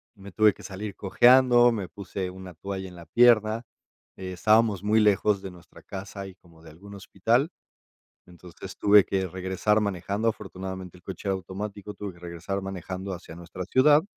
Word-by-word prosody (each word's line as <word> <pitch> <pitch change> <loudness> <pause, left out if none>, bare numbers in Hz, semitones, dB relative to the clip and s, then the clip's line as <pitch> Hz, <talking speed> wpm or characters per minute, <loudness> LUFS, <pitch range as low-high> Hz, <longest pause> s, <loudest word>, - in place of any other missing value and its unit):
me 100 -1 -12
tuve 105 +3 +4
que - - -16
salir 100 +1 -6
cojeando, 120 +3 +5
me 105 -5 -3
puse 95 +1 -6
una 95 -1 -11
toalla 95 +2 -5
en 90 - -12
la 85 -1 -12
pierna. 115 -1 +4 0.5
Estábamos 100 +2 +2
muy 105 +2 +3
lejos 105 -1 +3
de 95 -1 -7
nuestra 90 -1 -17
casa 100 0 -7
y 95 - -12
como 85 -4 -21
de 80 - -13
algún 100 +6 -13
hospital. 115 - 0 0.8
Entonces, 90 +2 -12
tuve 105 -1 +6
que 95 -1 -1
regresar 95 +4 0
manejando, 100 +2 -1
afortunadamente, 95 -4 -6
el - - -23
coche 95 +2 -7
era - - +2
automático, 100 +2 -6
tuve 100 -2 -6
que - - -18
regresar 85 +3 -5
manejando 95 0 -5
hacia 85 -2 -11
nuestra 85 +1 -7
ciudad. 145 - +5
95 Hz, 170 wpm, -26 LUFS, 90-105 Hz, 0.8 s, tuve